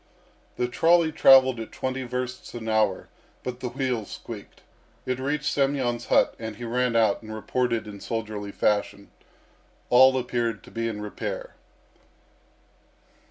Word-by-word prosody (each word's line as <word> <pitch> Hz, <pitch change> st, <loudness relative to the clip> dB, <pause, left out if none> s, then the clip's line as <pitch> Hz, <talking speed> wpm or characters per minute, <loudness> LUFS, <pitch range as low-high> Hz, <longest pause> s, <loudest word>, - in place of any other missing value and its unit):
The 125 Hz, -, 0 dB
trolley 165 Hz, +5 st, +3 dB
travelled 130 Hz, -4 st, +6 dB
at 115 Hz, -, -7 dB
twenty 130 Hz, 0 st, -3 dB
versts 125 Hz, 0 st, -5 dB
an 115 Hz, -1 st, -6 dB
hour, 110 Hz, -3 st, +1 dB, 0.4 s
but 125 Hz, -1 st, -5 dB
the 125 Hz, -1 st, -3 dB
wheels 125 Hz, -5 st, -2 dB
squeaked. 110 Hz, -4 st, -9 dB, 0.4 s
It 130 Hz, 0 st, -2 dB
reached 145 Hz, +2 st, -2 dB
Semyon's 135 Hz, -5 st, 0 dB
hut, -, -, +3 dB
and 110 Hz, -1 st, -5 dB
he 120 Hz, -, -9 dB
ran 125 Hz, 0 st, 0 dB
out 110 Hz, -3 st, +3 dB
and 110 Hz, -1 st, -10 dB
reported 115 Hz, +1 st, -1 dB
in 105 Hz, -1 st, -9 dB
soldierly 105 Hz, -2 st, -4 dB
fashion. 100 Hz, -1 st, -1 dB, 0.8 s
All 130 Hz, +1 st, +7 dB
appeared 120 Hz, -4 st, -2 dB
to -, -, -14 dB
be 115 Hz, 0 st, -2 dB
in 105 Hz, -2 st, -4 dB
repair. -, -, -5 dB
120 Hz, 140 wpm, -26 LUFS, 110-130 Hz, 0.8 s, All